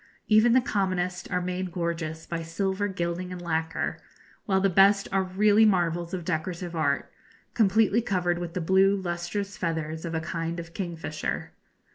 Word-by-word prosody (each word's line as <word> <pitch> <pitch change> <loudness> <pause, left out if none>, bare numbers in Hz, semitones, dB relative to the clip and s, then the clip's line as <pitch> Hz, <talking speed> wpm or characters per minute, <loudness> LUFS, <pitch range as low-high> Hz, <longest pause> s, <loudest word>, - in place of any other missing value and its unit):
Even 220 +2 +5
the 255 - +5
commonest 185 -7 -1
are 180 0 -1
made 180 0 -3
gorgeous 165 -2 -3
by 170 -1 -4
silver 190 +4 -1
gilding 180 -1 -3
and 180 - -6
lacquer, 165 -1 -2 0.5
while 190 -2 +3
the 195 - +3
best 195 +2 +5
are 195 0 +2
really 205 +3 +4
marvels 175 -4 +2
of 180 -3 -4
decorative 170 +1 -3
art, 145 -3 0 0.4
completely 220 +1 +3
covered 180 -5 0
with 170 -1 -6
the 180 - -1
blue 190 +3 +4
lustrous 190 +2 -3
feathers 160 -1 -3
of 165 -1 -4
a - - +1
kind 165 0 -3
of 170 0 -8
kingfisher. 165 -4 -4
180 Hz, 160 wpm, -27 LUFS, 170-195 Hz, 0.5 s, Even